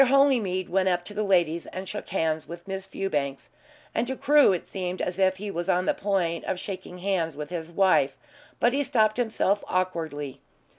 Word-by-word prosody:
Holymead 250 -9 +3
went 190 +1 +2
up 175 -1 0
to 205 - -7
the 210 - -2
ladies 175 -5 +2
and 185 +1 -6
shook 210 - -6
hands 160 -5 0
with 170 +3 -9
Miss 195 0 -5
Fewbanks, 145 -9 -2 0.4
and 230 - 0
to 265 - -2
Crewe 290 -3 +5
it 180 - -2
seemed 185 -1 -4
as 180 +1 -2
if 190 -1 +4
he 205 +1 -5
was 175 -1 -3
on 180 +1 +2
the - - +3
point 185 -5 0
of 180 - -2
shaking 185 -2 -6
hands 175 -5 -1
with 150 +2 -6
his 170 -1 -5
wife, 190 +1 +3 0.4
but 240 +1 +3
he 280 - +2
stopped 220 -5 +2
himself 220 -4 +1
awkwardly. 160 -7 -2
185 Hz, 195 wpm, -26 LUFS, 170-205 Hz, 0.4 s, Crewe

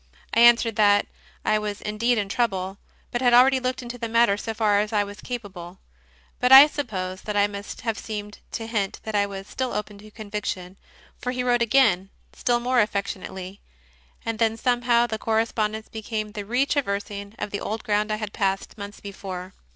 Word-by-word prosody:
I - - +3
answered 235 -1 +6
that 205 -1 +5 0.4
I 215 - +3
was 210 -1 -4
indeed 230 +3 0
in 205 -2 0
trouble, 195 -4 -1 0.3
but 240 - -2
had 245 -2 +5
already 260 +2 +6
looked 255 0 -2
into 245 0 -7
the 230 -1 -3
matter 230 -3 +4
so 225 +2 -4
far 215 -2 +2
as 210 0 -1
I 210 -2 +2
was 205 +1 -9
ca 245 - -3
pable. 185 -5 -11 0.6
But 250 +1 +2
I 270 +2 +12
suppose 190 -11 -4
that 210 -1 -3
I 205 - +5
must 205 0 -6
have 225 -2 -2
seemed 210 -1 -6
to 225 - -3
hint 210 -4 -2
that 220 - -5
I 200 -1 +2
was 195 -1 -7
still 260 +4 -3
open 210 -1 -4
to 215 +1 -13
conviction, 205 -4 -5 0.4
for 250 - -2
he 250 0 -2
wrote 245 -1 +2
again, 210 -6 +3 0.2
still 240 -1 +1
more 250 0 +2
affectionately, 195 -2 -4 0.6
and 225 -1 -3
then 225 -1 +2
somehow 240 -1 +2
the 220 -2 -4
correspondence 220 -1 -1
became 215 -1 -4
the 205 -1 -6
retraversing 205 -5 -1
of 205 - -4
the 205 - -3
old 220 +1 -4
ground 210 -1 0
I - - +1
had 215 -1 -5
passed 195 +2 -2
months 200 0 -8
before. 190 -2 -7
215 Hz, 190 wpm, -24 LUFS, 200-235 Hz, 0.6 s, I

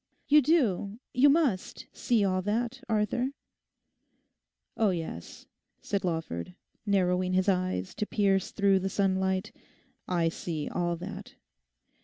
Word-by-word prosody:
You 300 +1 +6
do, 235 - +1
you 270 +3 +6
must 280 - +1
see 230 -5 +1
all 185 -1 +1
that, 235 +5 -2
Arthur?' 220 +4 +1 1.5
'Oh 220 -2 +3
yes,' 165 - -5 0.4
said 200 -1 -2
Lawford, 165 - -3 0.3
narrowing 185 -2 +2
his 185 +1 +2
eyes 185 - 0
to 210 - -2
pierce 195 -3 +1
through 200 -2 +3
the 195 +1 -2
sunlight, 190 -1 0 0.6
'I 170 -2 +1
see 160 -2 -4
all 175 -1 -1
that. 180 +4 -8
195 Hz, 120 wpm, -29 LUFS, 180-215 Hz, 1.5 s, You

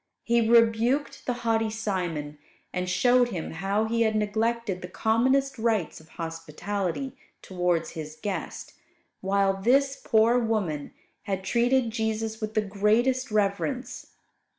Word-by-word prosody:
He 235 -1 +2
rebuked 235 +4 +3
the 250 - +1
haughty 225 -1 +2
Simon; 180 -9 -3 0.3
and 180 0 -2
showed 245 +5 +4
him 175 -8 -4
how 195 +6 0
he 230 +1 0
had 220 -1 +2
neglected 215 -2 -1
the 180 - -6
commonest 260 +7 +1
rites 220 -7 0
of 160 0 -19
hospitality 170 - -4 0.3
towards 180 -3 -1
his 155 -2 -7
guest, 205 -2 -5 0.5
while 195 0 +1
this 275 +5 +3
poor 230 +2 +4
woman 205 -11 -1 0.3
had 190 -2 -2
treated 240 +3 +2
Jesus 220 0 -2
with 215 0 -4
the 215 - +3
greatest 220 +6 +1
reverence. 215 +5 -1
220 Hz, 125 wpm, -26 LUFS, 190-235 Hz, 0.5 s, showed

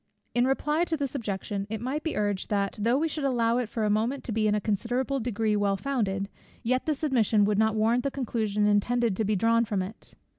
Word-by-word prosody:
In 245 +1 +3
reply 300 +4 +1
to 325 -2 -1
this 280 -3 -3
objection 200 -5 -3
it 220 0 -3
might 260 +6 -2
be 320 0 -3
urged, 205 -2 -1
that 200 -1 0
though 235 +4 +3
we 320 +3 +1
should 305 -1 -4
allow 240 -3 +2
it 240 -3 -2
for 225 - -2
a - - +1
moment 230 +6 0
to - - -5
be 215 0 +1
in 210 - +2
a - - +1
considerable 245 +6 -1
degree 220 -2 0
well 200 -1 +1
founded, 200 -7 -1 0.4
yet 255 +4 0
this 305 -1 -1
admission 225 -7 +3
would 205 0 +1
not 220 0 +3
warrant 225 +3 +2
the 275 - 0
conclusion 220 -6 -1
intended 215 +1 +2
to 220 - 0
be 210 +1 +1
drawn 230 +3 +3
from 205 -4 -1
it. 205 +5 -10
225 Hz, 230 wpm, -27 LUFS, 210-255 Hz, 0.4 s, In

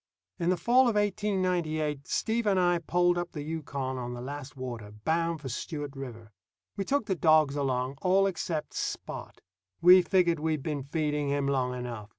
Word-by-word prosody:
In 170 0 +1
the 185 - +2
fall 245 +8 +4
of 225 - -1
1898, 180 -8 0
Steve 230 0 0
and 195 -2 +3
I 175 -1 +3
poled 175 +1 +2
up 175 0 -5
the 150 - -5
Yukon 140 -4 -4
on 125 0 -4
the - - -7
last 135 +1 -7
water, 120 -5 -6
bound 160 +9 -1
for 140 - -6
Stewart 145 +3 -5
River. 115 -5 -8 0.4
We 195 - -2
took 280 0 +1
the 195 - 0
dogs 155 -4 +4
along, 135 -1 -1
all 190 +1 +4
except 170 -4 -2
Spot. - - -5 0.4
We 180 +2 +8
figured 175 -3 +2
we'd 155 -2 -1
been 150 -3 -2
feeding 150 0 -1
him 140 0 0
long 130 -2 0
enough. 120 -4 -6
155 Hz, 175 wpm, -29 LUFS, 135-180 Hz, 0.4 s, We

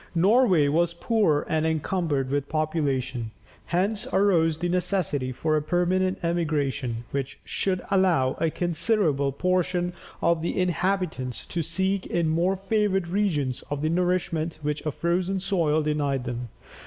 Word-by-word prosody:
Norway 190 - +4
was 170 +3 +1
poor 175 -6 +1
and 155 0 0
encumbered 160 -3 0
with 145 0 -1
population. 140 -7 -1 0.4
Hence 200 +5 0
arose 170 -5 +3
the 175 +2 -2
necessity 175 -7 0
for 155 +5 0
a 155 - +2
permanent 180 +3 +1
emigration, 145 -8 -1
which 140 -1 -3
should 185 -2 -1
allow 180 -9 +3
a 165 - +2
considerable 165 -4 0
portion 180 +3 0 0.3
of 170 -1 +2
the 170 - -2
inhabitants 180 -8 -1
to 170 - -3
seek 190 +4 -1
in 170 -2 0
more 175 +4 +2
favoured 195 -2 0
regions 165 -10 0 0.2
the 155 +2 0
nourishment 170 -2 0
which 150 0 -2
a - - +1
frozen 180 +5 0
soil 170 -6 +1
denied 145 -3 0
them. 120 -1 -5
170 Hz, 135 wpm, -26 LUFS, 150-185 Hz, 0.4 s, Norway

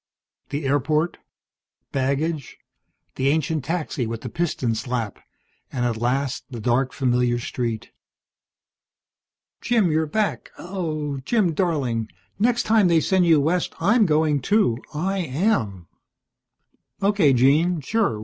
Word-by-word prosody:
The 145 +1 -3
airport, 150 +4 +1 0.7
baggage, 140 +2 -1 0.6
the 130 - +1
ancient 155 0 +1
taxi 155 -7 -2
with 115 0 -5
the - - -5
piston 165 -9 -1
slap, 115 -1 -3 0.5
and 125 -2 -1
at 120 -2 0
last 130 +3 -1
the 120 -3 -7
dark, 125 +3 +1
familiar 125 -2 +1
street. 120 -2 -4 1.7
"Jim, 220 -8 +2
you're 160 0 +1
back! 215 +6 -1
Oh, 155 -6 -3
Jim, 180 - +1
darling. 135 - -1 0.3
Next 240 +3 +2
time 215 -3 +4
they 170 -2 +4
send 185 +2 +2
you 160 -3 +6
west 165 +5 0
I'm 210 +5 +4
going 150 -2 +2
too. 200 - +2
I 190 +6 -1
am!" 130 - 0 1.2
"Okay, 200 -7 +4
Jean, 150 +7 +3
sure. 175 - 0
150 Hz, 120 wpm, -23 LUFS, 125-175 Hz, 1.7 s, you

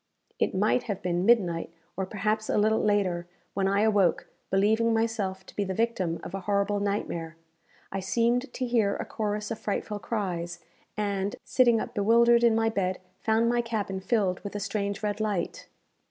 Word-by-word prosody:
It - - +1
might 215 +6 +3
have 200 -3 -3
been 180 +2 0
midnight, 180 -9 +3 0.2
or 190 0 -2
perhaps 215 +2 -1
a - - +2
little 215 +1 +3
later, 185 -5 +1 0.3
when 195 0 +1
I 200 +1 +2
awoke, 205 -5 +2 0.2
believing 220 +4 +3
myself 210 -4 -1
to - - -14
be 205 - 0
the 190 -1 -3
victim 190 -7 0
of - - -7
a 195 - -2
horrible 200 +1 0
nightmare. 170 -5 -2 0.6
I 195 - -2
seemed 235 +6 +1
to 255 - -3
hear 230 -5 +2
a - - -4
chorus 210 0 -3
of 225 - -3
frightful 210 0 -3
cries, 175 -6 -3 0.4
and, 200 -1 -1
sitting 240 -3 +4
up - - -5
bewildered 235 +3 +4
in 230 -2 +5
my 225 0 +2
bed, 190 -4 -1 0.2
found 225 +1 +2
my 240 0 +2
cabin 210 -5 -3
filled 190 -2 +1
with 200 0 -8
a - - -1
strange 200 0 -2
red 210 0 -1
light. 210 -4 -2
205 Hz, 180 wpm, -27 LUFS, 190-225 Hz, 0.6 s, in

